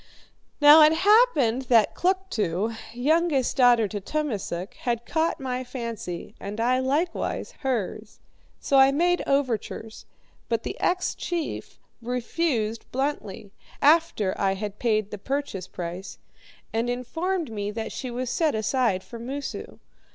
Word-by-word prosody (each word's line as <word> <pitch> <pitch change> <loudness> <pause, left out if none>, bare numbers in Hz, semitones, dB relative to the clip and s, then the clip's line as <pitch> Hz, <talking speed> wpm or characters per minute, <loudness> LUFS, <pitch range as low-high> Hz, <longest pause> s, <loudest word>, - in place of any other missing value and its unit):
"Now, 295 +1 +9
it 305 +1 +7
happened 320 - +4
that 225 -4 +5
Kluktu, 230 - -1 0.2
youngest 285 +3 +1
daughter 245 -4 +5
to 205 -1 -4
Tummasook, 205 - -3
had 235 -1 -2
caught 325 0 0
my 255 -1 -3
fancy, 230 -8 -6
and 205 +2 -6
I 250 +2 +2
likewise 290 +7 -1
hers. 225 -5 -3 0.4
So 275 - +2
I 270 0 +7
made 350 +5 +2
overtures, 235 -5 -2 0.4
but 230 -1 0
the - - -4
ex 360 0 +1
chief 340 -3 -4 0.2
refused 240 -1 -2
bluntly 255 -7 -3 0.3
after 295 - +3
I 195 -1 +2
had 205 +1 -6
paid 215 -3 +1
the 210 - -6
purchase 265 -7 -3
price 180 +2 -6 0.6
and 230 +2 0
informed 325 +6 -2
me 205 -2 -3
that 220 +1 -4
she 255 - -5
was 245 0 -3
set 315 -6 +1
aside 220 -3 +1
for 235 - -10
Moosu. 275 +4 -6
245 Hz, 130 wpm, -25 LUFS, 215-295 Hz, 0.6 s, Now